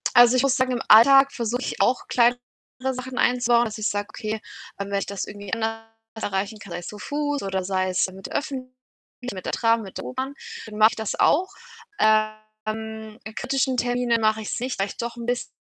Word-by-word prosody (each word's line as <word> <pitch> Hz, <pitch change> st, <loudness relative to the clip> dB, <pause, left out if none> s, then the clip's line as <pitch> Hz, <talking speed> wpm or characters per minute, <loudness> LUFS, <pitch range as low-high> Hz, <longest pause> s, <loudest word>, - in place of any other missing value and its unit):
Also 245 Hz, +1 st, +8 dB
ich 255 Hz, -, +3 dB
muss 270 Hz, -1 st, +3 dB
sagen, 255 Hz, -1 st, +1 dB
im 240 Hz, -, -2 dB
Alltag 270 Hz, +5 st, +8 dB
versuche 235 Hz, +1 st, -2 dB
ich -, -, -3 dB
auch 250 Hz, -, +2 dB
kleinere 245 Hz, 0 st, +4 dB, 0.6 s
Sachen 255 Hz, 0 st, -7 dB
einzubauen, 245 Hz, -1 st, +3 dB
dass 220 Hz, -1 st, -5 dB
ich 215 Hz, -, +1 dB
sage: 205 Hz, 0 st, -2 dB
„Okay, 215 Hz, 0 st, -4 dB, 0.4 s
ähm, 200 Hz, 0 st, -4 dB
wenn 200 Hz, -, +1 dB
ich -, -, -3 dB
das 200 Hz, -1 st, -3 dB
irgendwie 205 Hz, -2 st, -9 dB
anders 225 Hz, 0 st, -1 dB, 0.4 s
erreichen 200 Hz, +2 st, -2 dB
kann, 200 Hz, -, -11 dB
sei 170 Hz, -, -3 dB
es 175 Hz, -, -9 dB
zu 210 Hz, -, -8 dB
Fuß 290 Hz, +4 st, -2 dB
oder 190 Hz, -1 st, -2 dB
sei 185 Hz, 0 st, 0 dB
es 185 Hz, -, +2 dB
mit 190 Hz, +1 st, -9 dB
den -, -, -10 dB
Öffentlichen, 255 Hz, -3 st, -4 dB, 0.6 s
mit 185 Hz, -2 st, -8 dB
der -, -, -3 dB
Tram, 230 Hz, -1 st, +3 dB
mit 195 Hz, -3 st, -9 dB
der -, -, -6 dB
U-Bahn, 260 Hz, +2 st, -4 dB, 0.3 s
dann 210 Hz, -1 st, -8 dB
mache 215 Hz, +1 st, +7 dB
ich -, -, -7 dB
das 220 Hz, -2 st, -3 dB
auch.“ 365 Hz, +6 st, +3 dB, 0.5 s
Ähm, 215 Hz, 0 st, -1 dB
in 220 Hz, 0 st, -9 dB
kritischen 265 Hz, -1 st, 0 dB
Terminen 245 Hz, -1 st, +1 dB
mache 220 Hz, 0 st, +2 dB
ich’s 215 Hz, -, -3 dB
nicht, 255 Hz, -1 st, -3 dB
weil 195 Hz, -, +1 dB
ich -, -, -10 dB
doch 235 Hz, 0 st, -4 dB
’n 235 Hz, -, -6 dB
biss 245 Hz, 0 st, -2 dB
225 Hz, 220 wpm, -24 LUFS, 210-250 Hz, 0.6 s, Also